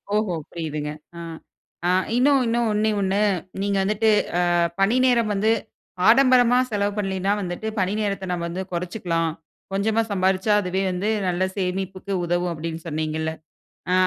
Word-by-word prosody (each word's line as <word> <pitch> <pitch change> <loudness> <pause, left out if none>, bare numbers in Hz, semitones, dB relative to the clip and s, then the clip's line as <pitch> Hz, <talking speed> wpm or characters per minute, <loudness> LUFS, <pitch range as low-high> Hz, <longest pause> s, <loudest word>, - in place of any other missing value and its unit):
ஓஹோ! 210 -5 +1 0.2
புரியுதுங்க, 150 -3 -4 0.3
அ. - - -6 0.9
இன்னும் 270 +2 +4
இன்னும் 235 0 +1
ஒண்ணே, 215 +1 +1
ஒண்ணு. 195 +1 +1 0.4
நீங்க 200 0 0
வந்துட்டு 215 +2 +2 0.4
அ - - +3 0.3
பணி 210 +5 +3
நேரம் 235 -4 +3
வந்து 210 +3 +2 0.6
ஆடம்பரமா 250 0 +6
செலவு 205 0 0
பண்லன்னா 195 -1 -1
வந்துட்டு 180 +3 -4
பணி 185 +2 +1
நேரத்த 200 -2 -2
நம்ம 170 -1 -2
வந்து 185 +3 -4
கொறச்சுக்கலாம். 170 -2 -1 0.4
கொஞ்சமா 220 +3 +1
சம்பாரிச்சா 190 +2 +2
அதுவே 185 +1 -1
வந்து 185 +4 -1 0.2
நல்ல 180 +1 0
சேமிப்புக்கு 190 +1 -3
உதவும் 175 +1 0
அப்டின்னு 165 +1 -6
சொன்னீங்கல்ல. 155 0 -2 0.6
அ - - +3
195 Hz, 135 wpm, -23 LUFS, 175-215 Hz, 0.9 s, ஆடம்பரமா